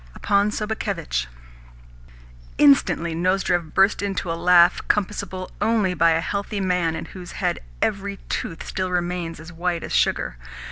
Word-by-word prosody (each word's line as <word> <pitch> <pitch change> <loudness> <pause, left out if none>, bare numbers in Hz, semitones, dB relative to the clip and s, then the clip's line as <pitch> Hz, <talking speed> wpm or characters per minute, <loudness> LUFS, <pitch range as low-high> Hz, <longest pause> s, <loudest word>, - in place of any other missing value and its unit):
"Upon 200 0 +2
Sobakevitch." 210 - -2 1.3
Instantly 160 +4 +4
Nozdrev 175 -1 0
burst 195 +2 +4
into 195 -3 -2
a - - 0
laugh 175 +1 +5
compassable 195 -2 -2
only 210 -4 +2
by 170 -1 +4
a 160 - +1
healthy 200 +3 -3
man 180 -4 0
in 160 - -5
whose 180 -2 -10
head - - -1 0.2
every 200 0 -2
tooth 165 - -4
still 185 -1 -2
remains 175 -2 -2
as 165 +2 -11
white 170 0 -2
as - - -6
sugar. - - +1
180 Hz, 140 wpm, -23 LUFS, 165-200 Hz, 1.3 s, laugh